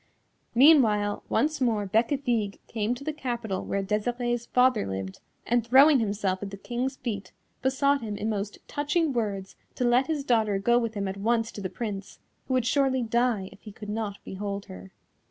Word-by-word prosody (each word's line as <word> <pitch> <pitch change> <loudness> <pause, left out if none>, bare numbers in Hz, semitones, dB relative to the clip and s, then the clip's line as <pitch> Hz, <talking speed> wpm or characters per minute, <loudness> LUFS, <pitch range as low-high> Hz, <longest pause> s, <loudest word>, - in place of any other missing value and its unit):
Meanwhile 230 -7 +5
once 305 0 +1
more 220 -5 +1
Bécafigue 225 0 0
came 225 +1 -1
to 275 - -10
the 310 +1 -2
capital 235 -9 -3
where 200 0 -2
Desirée's 240 +4 -1
father 250 - +3
lived, 95 0 -5 0.3
and 240 0 +2
throwing 270 +5 +6
himself 200 -3 -1
at 205 - -4
the 200 - -8
King's 245 +6 -3
feet, 210 -7 -5 0.3
besought 280 +1 +2
him 210 -3 -4
in 215 - -3
most 205 -1 -3
touching 295 +1 0
words 200 -5 -3 0.2
to - - -1
let 245 +2 +3
his 310 -3 -1
daughter 220 -6 +2
go 235 +5 +3
with 230 -2 -3
him 200 -1 -2
at 190 +1 -4
once 225 +2 0
to 205 - -8
the 185 - -3
Prince, 200 -2 -5 0.3
who 260 - 0
would 250 -2 +1
surely 260 -1 +2
die 230 -4 0
if - - -17
he 215 - -10
could 210 0 -9
not 210 -2 -3
behold 200 +1 -4
her. 95 +1 -11
225 Hz, 185 wpm, -27 LUFS, 200-255 Hz, 0.3 s, throwing